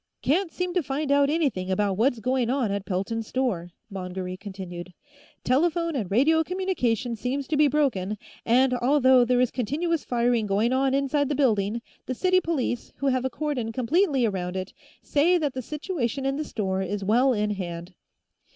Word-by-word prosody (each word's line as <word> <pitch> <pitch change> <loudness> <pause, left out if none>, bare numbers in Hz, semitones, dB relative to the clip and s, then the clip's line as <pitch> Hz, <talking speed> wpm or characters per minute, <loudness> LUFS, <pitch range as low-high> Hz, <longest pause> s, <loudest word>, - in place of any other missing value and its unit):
"... - - -57
Can't 335 +4 +1
seem 360 -1 -3
to 360 - +2
find 280 +1 -2
out 280 0 +4
anything 280 - 0
about 200 +1 +1
what's 240 +5 +2
going 255 +1 0
on 255 -5 0
at 200 -1 -3
Pelton's 215 +4 -2
store," 225 -10 -1 0.2
Mongery 185 -1 -5
continued. 185 -3 -8 0.5
"Telephone 335 +4 +1
and 215 -9 -2
radio 310 +9 +3
communication 275 - -1
seems 260 +4 -3
to 310 - 0
be 295 0 +5
broken, 230 -9 0 0.3
and, 255 +2 +3
although 260 0 +4
there 245 +1 +2
is 250 -1 +2
continuous 300 +7 -1
firing 235 -2 +1
going 210 +5 +1
on 265 0 +2
inside 280 +1 +1
the 295 - 0
building, 230 -4 +1 0.2
the 255 - -2
city 370 +5 +3
police, 285 -8 -2
who 280 - -4
have 255 -1 0
a - - +1
cordon 260 -5 -3
completely 265 - +2
around 185 -4 -2
it, 185 0 -4 0.3
say 330 +5 +3
that 295 -5 -1
the 255 - -4
situation 280 - -3
in 270 0 0
the 305 - -2
store 190 -6 -2
is 195 +2 -3
well 240 +7 +3
in 210 -3 0
hand. 175 -2 -5
250 Hz, 180 wpm, -25 LUFS, 205-285 Hz, 0.5 s, be